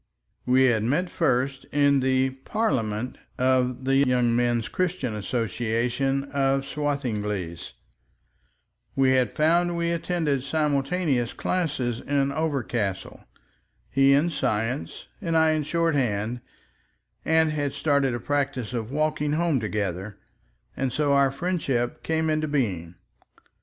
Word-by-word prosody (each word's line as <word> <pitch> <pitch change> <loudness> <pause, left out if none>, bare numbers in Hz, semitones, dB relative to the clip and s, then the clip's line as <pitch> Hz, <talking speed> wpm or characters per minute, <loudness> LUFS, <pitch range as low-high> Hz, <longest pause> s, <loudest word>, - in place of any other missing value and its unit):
We 130 +1 +5
had 120 -4 +3
met 150 +11 0
first 135 -3 0
in 140 -1 +3
the 130 0 +2
"Parliament" 130 - -2 0.2
of 130 0 +1
the 135 0 +3
Young 125 -3 +3
Men's 120 -1 +1
Christian 175 -10 -2
Association 120 +5 -1
of 135 -1 +1
Swathinglea; 105 - -2 1.4
we 135 -1 +3
had 130 -4 +2
found 170 +3 +2
we 170 0 0
attended 165 -5 0
simultaneous 140 -2 0
classes 135 -10 -1
in 140 -1 0
Overcastle, 130 - -2 0.7
he 135 0 +5
in 150 +5 +3
science 115 0 -2 0.2
and 165 -4 0
I 160 0 +4
in 155 0 +1
shorthand, 125 -9 0 0.8
and 160 -1 +3
had 145 -2 -2
started 140 -3 +1
a - - -3
practice 135 -3 -2
of 115 -2 -3
walking 150 +1 0
home 165 -3 +1
together, 100 -2 -3 0.6
and 135 -1 -1
so 145 +2 +1
our 140 -1 +4
friendship 135 -6 -1
came 160 0 0
into 155 0 0
being. 95 - -2
135 Hz, 120 wpm, -25 LUFS, 120-150 Hz, 1.4 s, We